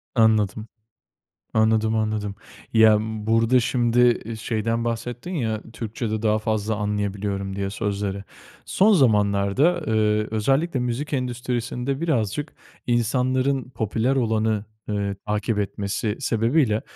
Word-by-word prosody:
Anladım, 110 -1 +2 0.9
anladım, 110 0 +2
anladım. 110 -2 -1 0.4
Ya, 110 -1 +6
burada 110 +3 +2
şimdi, 120 0 +3
e, 115 +1 -5
şeyden 115 +1 -2
bahsettin 120 +7 -4
ya, 110 -9 -1
Türkçede 110 -1 -4
daha 110 -1 +2
fazla 110 0 -1
anlayabiliyorum 100 -1 -2
diye 100 0 -2
sözleri. 100 -1 -3 0.4
Son 210 +3 +4
zamanlarda, 110 - +3
eee, 105 -1 +2
özellikle 135 +7 +1
müzik 125 +5 -3
endüstrisinde 125 +1 -2
birazcık 145 - -1 0.3
insanların 130 +3 +1
popüler 115 +2 -1
olanı, 110 -3 0 0.2
eee, 100 -1 -1
takip 105 +1 -1
etmesi 100 +2 -2
sebebiyle, 115 -2 +1
110 Hz, 105 wpm, -23 LUFS, 105-125 Hz, 0.9 s, Ya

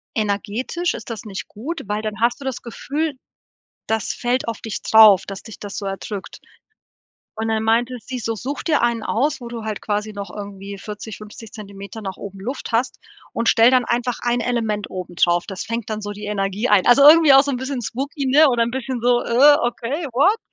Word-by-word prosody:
energetisch 215 - -1
ist - - -8
das 225 0 -7
nicht 195 -3 -6
gut, 290 +11 -6
weil 210 +1 -2
dann 215 -1 -5
hast 240 +3 +1
du - - -8
das 265 -2 -4
Gefühl, 290 +6 -3 0.7
das 220 -2 -1
fällt 245 +1 -1
auf 230 -1 -4
dich 225 - -5
drauf, 215 -3 +7
dass 195 -1 -7
dich 220 - -11
das 205 -1 -7
so 205 - -4
erdrückt.“ 195 +1 -6 1.0
Und 220 0 -3
dann 220 0 0
meinte 235 +3 +1
sie 250 +2 -6
so: 225 0 -2
„Such 275 +6 -5
dir 305 -4 +2
einen 235 -1 +1
aus, 270 +8 0
wo 240 - -7
du 235 -2 -7
halt 215 -2 -4
quasi 210 0 -2
noch 200 -1 -7
irgendwie 200 -1 -8
40, 210 +1 -8
50 215 +1 -11
Zentimeter 200 0 -9
nach 190 -1 -5
oben 195 -1 -9
Luft 255 +8 -5
hast, 240 +2 -1 0.3
und 230 - -1
stell 230 +3 +6
dann 255 -1 +4
einfach 240 0 -1
ein 240 0 +1
Element 225 -4 -1
oben 180 -1 -7
drauf. 175 0 +2
Das 195 -2 -5
fängt 230 0 -4
dann 215 0 -3
so 205 0 -5
die 205 +1 -8
Energie 205 +2 -1
ein.“ 205 -3 +4
Also, 245 +3 +6
irgendwie 315 -2 +8
auch 270 0 +8
so 285 - -2
'n 265 - -1
bisschen 260 0 -4
spooky, 275 +5 -4
ne? 295 +4 +6
Oder 240 -3 +2
ein 230 - 0
bisschen 260 0 -4
so: 245 0 +3
„Äh, 280 +5 +6
okay, 240 +6 -2
what?“ 370 - +3
230 Hz, 215 wpm, -21 LUFS, 210-250 Hz, 1.0 s, irgendwie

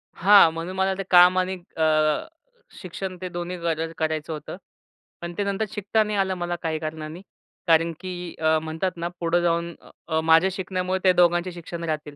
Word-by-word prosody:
हां, 195 -2 +6
म्हणून 170 +3 -5
मला 190 0 +1
ते 195 - -3
काम 180 +1 +7
आणि 185 +1 -1 0.2
अ, 155 -1 +2 0.5
शिक्षण 185 0 -6
ते 185 - -4
दोन्ही 175 +1 -5
गर 165 -1 -2
करायचं 155 0 -2
होतं. 155 +3 -7 0.6
पण 170 0 -6
ते 205 - 0
नंतर 200 +2 -1
शिकता 210 +1 0
नाही 210 -1 -3
आलं 190 -1 +1
मला 175 0 -3
काही 160 -2 -2
कारणांनी. 155 +2 -6 0.5
कारण 165 0 +4
की 180 -2 -7
अ, 160 0 +3
म्हणतात 160 +4 -3
ना 170 +1 -3
पुढं 170 +1 +1
जाऊन 170 0 0 0.4
अ, 160 - +1
माझ्या 165 +3 +4
शिकण्यामुळे 185 -1 -2
त्या 185 - +5
दोघांचे 175 0 +3
शिक्षण 170 0 -8
राहतील. 150 -2 -4
175 Hz, 180 wpm, -24 LUFS, 160-185 Hz, 0.6 s, काम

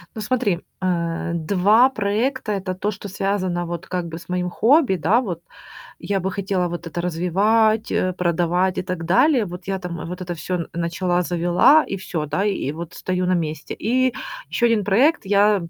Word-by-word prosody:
Ну 220 - -5
смотри, 210 -5 0 0.2
а, 170 -2 -1
2 200 +9 +4
проекта- 215 +1 -1
это 190 -2 -2
то, 205 +3 -1
что 200 0 -8
связано 185 -2 -1
вот 170 +2 -5
как 180 -1 -2
бы 165 0 -7
с - - -15
моим 180 0 -1
хобби, 250 - +3
да, 200 +7 +3
вот. 175 -9 -5 0.6
Я 200 -1 0
бы 190 +1 -2
хотела 190 -2 -1
вот 175 0 -6
это 165 +1 -5
развивать, 205 +6 +2
э, 185 0 +1
продавать 175 +1 +1
и - - +1
так 180 -2 -4
далее. 250 - +4
Вот 180 -1 -9
я 195 -1 -1
там, 175 -2 -6
а, - - -6
вот 180 +2 -6
это 175 -1 -4
всё 170 +1 -3
начала, 175 +1 0
завела 175 - +4
и - - -2
всё, 175 -5 -4
да, 155 +6 -1
и 195 -9 -1
вот 170 +1 -7
стою 185 0 -2
на 185 - +3
месте. 155 -3 -3
И 255 +3 +2 0.4
ещё 240 - +1
1 230 -3 +2
проект, 235 - +3
я, 205 +1 +4
эм, 170 -3 -6
185 Hz, 195 wpm, -22 LUFS, 175-210 Hz, 0.6 s, 2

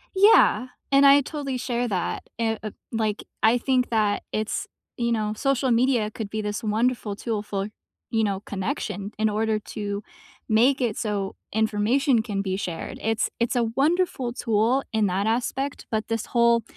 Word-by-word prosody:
Yeah, 390 - +6 0.2
and 275 0 +6
I 280 +1 +8
totally 280 -2 -4
share 245 -1 -1
that 185 -5 -2 0.2
e 225 -1 +1
uh, 215 - -4 0.2
like, 220 -2 -1 0.2
I 225 +2 +5
think 255 0 +1
that 215 -3 +1
it's 215 0 -2 0.3
You 235 -1 0
know, 215 -2 0
social 270 +1 +1
media 235 -2 +2
could 215 -1 -6
be 215 +1 -3
this 210 +1 -3
wonderful 220 0 0
tool 215 -1 -3
for, 200 -1 -3 0.4
you 225 -1 +1
know, 200 -2 0
connection, 200 +1 -3
in 220 0 +3
order 215 +1 0 0.2
to 205 -1 -3 0.5
make 245 +5 +4
it 230 -4 0
so 205 -3 -2 0.2
information 220 +4 +2
can 205 -4 -2
be 190 -1 -2
shared, 175 -4 -5
it's 225 0 0
it's 235 +1 0
a 240 -1 +2
wonderful 290 -4 +1
tool 230 +3 +2
in 220 -1 +2
that 195 +3 0
aspect, 255 +4 -1
but 220 -1 -1
this 225 -1 -2
whole 235 -1 +3
225 Hz, 170 wpm, -25 LUFS, 210-250 Hz, 0.5 s, I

